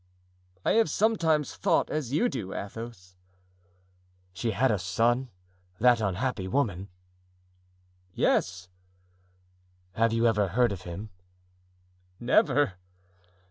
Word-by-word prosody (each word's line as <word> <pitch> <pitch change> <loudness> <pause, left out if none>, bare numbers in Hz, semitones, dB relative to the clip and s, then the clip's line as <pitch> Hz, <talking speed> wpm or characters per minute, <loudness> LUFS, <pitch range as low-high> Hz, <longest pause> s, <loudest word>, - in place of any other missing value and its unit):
"I - - +3
have 225 0 +3
sometimes 165 - +1
thought - - +1
as 150 -6 -2
you 155 - +2
do, 100 - -5
Athos." 100 -3 -8 1.2
"She 115 +5 -2
had 125 +4 +2
a 105 - 0
son, 115 +8 +1 0.5
that 120 -1 +4
unhappy 100 +1 -1
woman?" 100 -5 -1 1.2
"Yes." 90 0 0 1.2
"Have 115 +4 +1
you 115 +1 +1
ever 105 -3 +3
heard 120 +5 +2
of 95 -2 -5
him?" 100 +5 -7 1.1
"Never." 125 -3 +2
115 Hz, 100 wpm, -28 LUFS, 95-130 Hz, 1.2 s, that